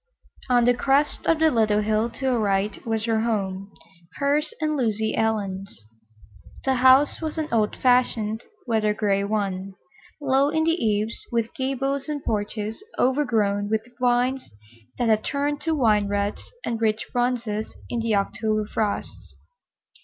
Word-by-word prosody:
On 245 -1 +4
the 245 - +5
crest 275 +4 +1
of 330 - +4
the 315 0 +4
little 215 -3 +2
hill 215 +2 +1
to 265 - -7
her 255 -3 +2
right 200 -1 0
was 225 -1 -1
her 225 -2 +1
home—hers 200 - -3
and 305 -1 0
Lucy 220 -4 0
Ellen's. 200 - -2 0.8
The 265 -1 +2
house 260 +4 +5
was 315 0 -4
an 310 -1 -1
old 215 -2 +1
fashioned, 235 -3 +1 0.2
weather 215 -3 +1
gray 200 -2 +1
one, 195 -2 -2 0.4
low 275 0 +2
in 315 +1 +1
the 330 - +3
eaves, 220 - 0
with 230 -1 -1
gables 270 +1 -2
and 290 -2 -3
porches 215 - -3
overgrown 225 -7 +1
with 220 0 0
vines 250 +1 +1 0.5
that 240 -2 +1
had 215 -1 +3
turned 290 +1 -1
to 325 -1 +1
wine 215 -7 +3
reds 205 0 -2 0.2
and 230 -1 -2
rich 220 -1 +1
bronzes 240 -3 -1 0.2
in 240 - -1
the 225 -2 +1
October 215 +2 0
frosts. 210 -1 -3
225 Hz, 145 wpm, -24 LUFS, 210-265 Hz, 0.8 s, the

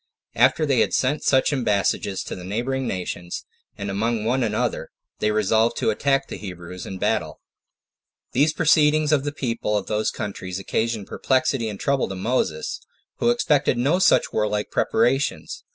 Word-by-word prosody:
After 130 +6 +3
they 135 -5 +2
had - - +2
sent 140 +4 +1
such 130 +2 +3
embassages 100 -5 0
to - - -6
the 90 - -9
neighboring 125 +7 -2
nations, 90 -1 -4 0.3
and 100 0 -4
among 110 +2 -1
one 125 +3 +1
another, 115 -3 -1 0.3
they 105 - +1
resolved 110 +2 +2
to - - +1
attack 135 +4 +1
the - - -6
Hebrews 90 -2 -8
in 95 - -6
battle. - - -1 0.9
2. 125 - 0
These 155 +2 +4
proceedings 155 -1 +3
of 145 -2 +2
the 145 - -1
people 115 -6 -1
of 100 - -3
those 110 0 0
countries 95 -3 -5
occasioned 110 +2 -2
perplexity 130 -2 0
and 100 -2 -7
trouble 140 -2 +1
to 95 - -5
Moses, 95 -6 -1 0.4
who - - +2
expected 150 - +2
no 140 +9 +2
such - - +3
warlike 105 -1 -1
preparations. 125 +5 0
115 Hz, 165 wpm, -23 LUFS, 100-135 Hz, 0.9 s, These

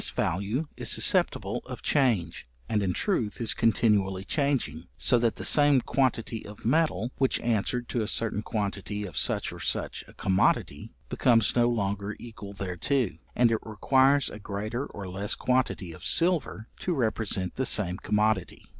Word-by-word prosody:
This - - +6
value 100 - -1
is - - -2
susceptible - - +2
of - - -8
change, 120 - 0 0.2
and 105 -2 0
in 95 -2 0
truth 110 - -1
is 115 - +2
continually 105 -5 +1
changing; 120 - -1
so 125 -2 +4
that 115 -1 +1
the - - -6
same 145 -2 +5
quantity 120 -4 -1
of 105 +1 -12
metal 125 - +1
which 135 -1 +2
answered 120 +1 -1
to 120 - -1
a 105 - -2
certain 110 -1 -1
quantity 105 -1 -3
of 90 -6 -9
such - - +1
or - - -10
such - - -1
a - - -16
commodity, 95 -1 0 0.2
becomes 115 -4 +3
no 120 -1 +4
longer 100 -2 -2
equal 105 -4 -10
thereto, 100 +5 -1 0.2
and 120 -1 +4
it 110 - +1
requires 130 +6 +2
a 105 - -9
greater 110 +6 -4
or 100 -2 -8
less 95 +3 -1
quantity 125 -8 -1
of 80 - -12
silver 165 -10 +1
to 180 - -1
represent 110 - -1
the 130 - -1
same 90 -4 +2
commodity. 105 -2 0
110 Hz, 165 wpm, -27 LUFS, 100-125 Hz, 0.2 s, This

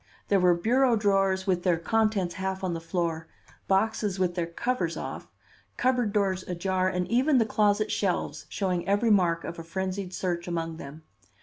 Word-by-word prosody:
There 200 - +4
were 180 -1 +4
bureau 240 +7 +3
drawers 195 -3 +2
with 180 -2 +1
their 175 -2 +2
contents 210 -1 +1
half 190 0 -3
on 180 -2 -1
the 165 - -4
floor, 165 -1 -2 0.4
boxes 205 0 +1
with 185 -2 +1
their 175 -2 -2
covers 175 -1 -2
off, - - -6 0.5
cupboard 250 -4 +1
doors 195 -3 +1
ajar 185 +1 0
and 180 -1 -2
even 260 +4 +3
the 230 - +4
closet 210 0 +1
shelves 190 -3 -1
showing 180 -3 -2
every 205 +3 +2
mark 175 -4 +3
of 170 - -6
a - - -6
frenzied 190 +2 -4
search 175 -2 -3
among 165 -2 -3
them. 150 +1 -10
190 Hz, 175 wpm, -27 LUFS, 175-210 Hz, 0.5 s, There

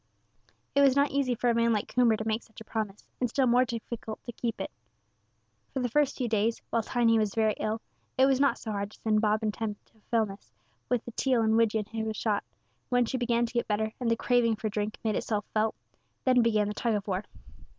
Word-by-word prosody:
It 280 - +4
was 275 -2 +5
not 280 0 +3
easy 270 -3 +1
for 240 +1 +2
a - - +2
man 230 0 +3
like 210 -2 +1
Coomber 240 -3 +4
to 220 - -4
make 220 +1 0
such 220 - -15
a - - -9
promise, 215 -2 -4
and 250 - +1
still 265 +3 +2
more 250 +1 +4
difficult 230 -2 -5
to 240 - -6
keep 235 0 -3
it. - - -4 1.0
For 270 - -2
the 250 -1 0
first 285 +2 +2
few 250 - -1
days, 225 +1 +1
while 230 - +2
Tiny 230 0 +2
was 215 -2 0
very 220 -1 +3
ill, 220 +1 -1 0.4
it 260 - +6
was 270 -1 +3
not 280 0 +3
so 220 - -5
hard 200 -1 -2
to - - -17
send 215 -1 +2
Bob 215 0 +2
and 215 -1 0
Tom 220 -2 -3
to 220 - -31
Fellness, 215 -4 -1 0.4
with 245 -2 0
the 240 - -6
teal 250 -1 +1
and 220 0 +3
widgeon 220 -2 +2
he 225 +2 -6
had 220 0 -2
shot; 210 -2 0 0.5
but 245 - 0
when 245 -1 +4
she 260 +2 -2
began 240 -1 +2
to 235 - -8
get 235 - 0
better, 220 +1 0
and 245 -2 0
the 230 - +3
craving 235 -2 +2
for 215 0 -3
the - - -10
drink 210 0 -2
made 220 -2 0
itself 210 -2 -1
felt, 220 0 +1 0.5
then 255 -2 +5
began 215 -3 +2
the 210 - -2
tug 230 +1 0
of 205 0 -3
war. 190 0 -1
225 Hz, 245 wpm, -29 LUFS, 215-245 Hz, 1.0 s, it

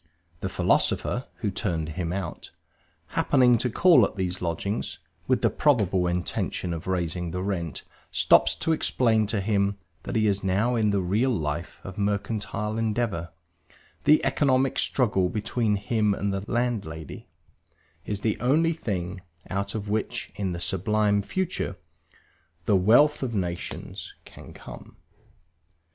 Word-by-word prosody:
The - - -3
philosopher 125 - +1
(who 105 - 0
turned 85 -6 -2
him 85 +1 -3
out), 95 -3 -5 0.6
happening 125 -4 +4
to 125 - 0
call 160 +1 +6
at 100 - 0
these 95 -2 -2
lodgings, 90 +5 -2 0.3
with - - +1
the - - +4
probable 100 - +2
intention 90 0 -2
of 80 +1 -6
raising 90 -1 -1
the 90 +2 -3
rent, 85 -6 -3 0.3
stops 85 +6 +4
to 125 - -1
explain 115 -8 +2
to 105 0 0
him 100 0 +1 0.2
that - - -5
he 110 -1 +3
is 100 -1 +1
now 100 +6 +1
in 110 -2 +2
the 100 -1 +1
real 105 +9 +1
life 80 -6 -3
of 95 +2 -8
mercantile 105 +1 -2
endeavor; 110 -6 -1 0.8
the 155 - +5
economic 135 -2 +2
struggle 100 -8 +1
between 110 +2 0
him 105 0 +1
and 100 0 -1
the 95 +2 -4
landlady 110 -10 -3 0.8
is 105 -1 -4
the 110 -1 0
only 155 +7 +3
thing 95 - -4 0.3
out 100 +2 -2
of 105 -1 -4
which, 110 +1 -2
in 95 -3 -2
the 85 - -4
sublime 105 +3 +1
future, 185 - -2 0.9
the 105 - +3
wealth 120 +11 +5
of 120 -4 -2
nations 90 -3 -4
can - - -13
come. - - -12
100 Hz, 140 wpm, -26 LUFS, 90-115 Hz, 0.9 s, call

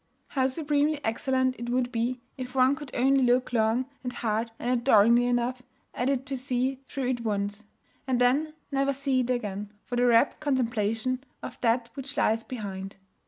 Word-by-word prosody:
How 265 -2 +1
supremely 295 +1 0
excellent 260 +3 0
it 240 0 -4
would 245 0 0
be 240 +1 -1
if 255 -1 -7
one 260 +1 +4
could 290 -2 -9
only 270 +2 +3
look 250 0 +2
long 225 +2 +2 0.2
and 250 - -3
hard 225 -1 -1
and 245 - -2
adoringly 235 -1 +5
enough 245 +1 0 0.3
at 245 +2 0
it 265 -1 0
to 275 -1 -3
see 255 0 -1
through 265 -3 -2
it 245 -2 -1
once; 205 -1 -2 0.4
and 255 -2 +1
then 285 +6 +2 0.2
never 275 0 +1
see 275 -1 0
it 250 -1 -1
again, 210 -4 -2
for 245 - -3
the 245 0 +4
rapt 235 +3 +4
contemplation 250 -2 0 0.2
of - - -8
That 235 0 +1
which 275 0 -7
lies 225 +1 +2
behind! 195 -5 -6
250 Hz, 175 wpm, -27 LUFS, 230-265 Hz, 0.4 s, adoringly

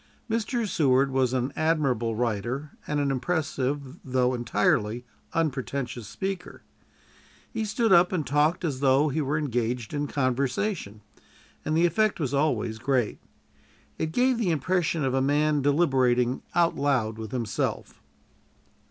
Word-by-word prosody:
Mr. 230 0 -1
Seward 135 -6 +2
was 130 -2 +2
an 130 +1 -1
admirable 135 -8 +1
writer 120 +5 -2 0.2
and 150 0 0
an 140 -1 +1
impressive 140 -1 -2
though 130 -1 +1
entirely 115 0 0 0.3
unpretentious 135 -6 -2
speaker. 190 - -5 0.9
He 225 -2 -1
stood 220 0 +2
up 175 0 +6
and 170 -6 -1
talked 150 +6 +1
as 140 -5 -2
though 140 +2 +3
he 155 +3 -1
were 145 +1 0
engaged 120 -4 -2
in 145 0 -1
conversation, 130 - -1 0.6
and 155 +1 0
the 170 - +4
effect 205 +5 +1
was 145 -4 -2
always 140 -6 0
great. 125 -2 0 0.8
It 160 0 -1
gave 250 +5 +2
the 210 -6 +1
impression 165 0 0
of 130 - 0
a 135 - +2
man 145 +2 +2
deliberating 130 -4 +2
"out 170 -1 +3
loud" 125 -6 0
with 110 -1 -6
himself. 115 -6 -3
140 Hz, 135 wpm, -26 LUFS, 125-160 Hz, 0.9 s, up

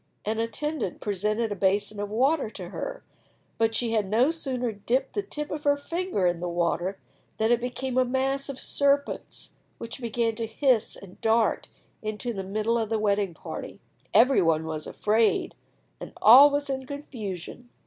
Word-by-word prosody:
An 220 +1 -1
attendant 285 - -2
presented 210 +2 -1
a - - -1
basin 200 +2 0
of 205 0 -3
water 265 +4 +1
to 185 -5 -8
her, - - -6 0.6
but 225 0 +2
she 235 0 0
had 215 -3 +1
no 240 +8 +3
sooner 255 -7 -2
dipped 240 +6 -1
the 410 - 0
tip 300 -6 -6
of 300 -1 -4
her 285 0 +3
finger 335 - -2
in 175 -1 +1
the 175 0 -3
water 175 +2 -1 0.4
than 220 +1 +2
it 240 0 +3
became 250 +1 -2
a - - +5
mass 270 +2 -1
of 270 -2 -5
serpents, 280 0 0 0.3
which 230 +3 -7
began 230 -1 0
to 230 -1 -2
hiss 245 0 +1
and 190 -2 -14
dart 225 0 +2 0.3
into 215 +3 -4
the 195 - -4
middle 215 +4 0
of 220 -2 -2
the 225 - +1
wedding 200 -4 0
party. - - -8 0.3
Every 255 0 +5
one 160 -2 +2
was 155 -1 -4
afraid, 220 +1 +1 0.5
and - - -9
all 265 +6 +9
was 285 0 -1
in 265 -1 -3
confusion. 245 - -7
230 Hz, 175 wpm, -26 LUFS, 205-270 Hz, 0.6 s, all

